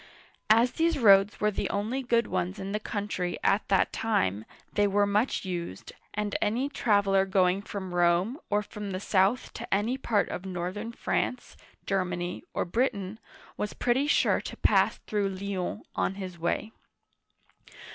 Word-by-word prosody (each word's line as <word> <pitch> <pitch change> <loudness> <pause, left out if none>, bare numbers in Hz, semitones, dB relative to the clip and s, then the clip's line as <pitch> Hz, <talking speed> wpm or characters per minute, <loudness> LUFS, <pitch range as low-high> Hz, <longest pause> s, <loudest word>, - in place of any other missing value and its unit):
As 230 +3 +5
these 330 -1 +1
roads 200 -4 +5
were 210 0 +2
the - - -2
only 220 +7 -1
good 235 -2 +2
ones 185 +1 -2
in 195 +1 -5
the 210 - -1
country 200 -5 -3
at 200 - +2
that 195 - +2
time, 110 - 0 0.3
they 205 0 +3
were 205 +1 +3
much 205 +3 0
used, 170 - -5 0.2
and 210 -1 -2
any 240 +7 +1
traveler 200 -7 +3
going 190 -1 +2
from 195 -3 -6
Rome, 175 - +2
or 210 0 +1
from 205 -1 -6
the 185 - -2
south 195 +4 +1
to - - -8
any 220 +7 +1
part 215 -5 +1
of 180 - -5
northern 190 +4 -4
France, 245 +1 -2 0.3
Germany, 180 -2 -2
or - - -1
Britain, 200 0 -1 0.4
was 210 - -3
pretty 255 +4 +1
sure - - +3
to - - -7
pass - - +3
through 205 -2 0
Lyons 190 -1 -4
on 195 - 0
his 185 -3 -7
way. 175 +6 -1
200 Hz, 155 wpm, -28 LUFS, 185-220 Hz, 0.4 s, As